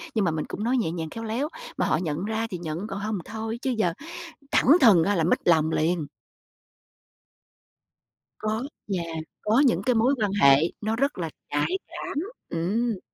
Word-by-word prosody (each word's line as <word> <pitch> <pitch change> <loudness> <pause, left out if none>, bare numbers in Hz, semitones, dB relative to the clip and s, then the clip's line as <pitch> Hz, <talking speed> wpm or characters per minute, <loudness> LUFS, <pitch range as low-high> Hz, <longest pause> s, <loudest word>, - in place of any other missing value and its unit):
nhưng 215 -3 +2
mà 170 - +2
mình 155 -1 -2
cũng 210 - -5
nói 245 +3 +2
nhẹ 220 -10 0
nhàng, 165 -2 -4
khéo 225 +7 -7
léo, 230 +6 -1 0.3
mà - - +1
họ - - +2
nhận 170 +1 -2
ra 220 +1 -1
thì 185 - -4
nhận, 170 +4 -4
còn 195 -2 -5
hông 210 0 -2
thì - - -11
thôi, 220 +1 -3
chứ 265 - -1
giờ 180 -6 +2 0.6
thẳng - - +3
thừng 200 -10 +7
á 205 +3 +1
là 165 - +2
mếch 170 - +2
lòng 160 -2 +4
liền. 160 -1 0 2.3
Có 215 +2 -1 0.3
yeah, 165 -2 -4 0.2
có 220 +4 +3
những 250 - +3
cái 250 - +3
mối 245 +5 +3
quan 205 -2 +1
hệ 140 0 +8 0.2
nó 220 +1 0
rất 275 +2 0
là 165 -2 -2 0.2
nhạy 145 - 0
cảm, - - -6 0.3
ừm. 205 +6 -1
205 Hz, 190 wpm, -26 LUFS, 165-225 Hz, 2.3 s, hệ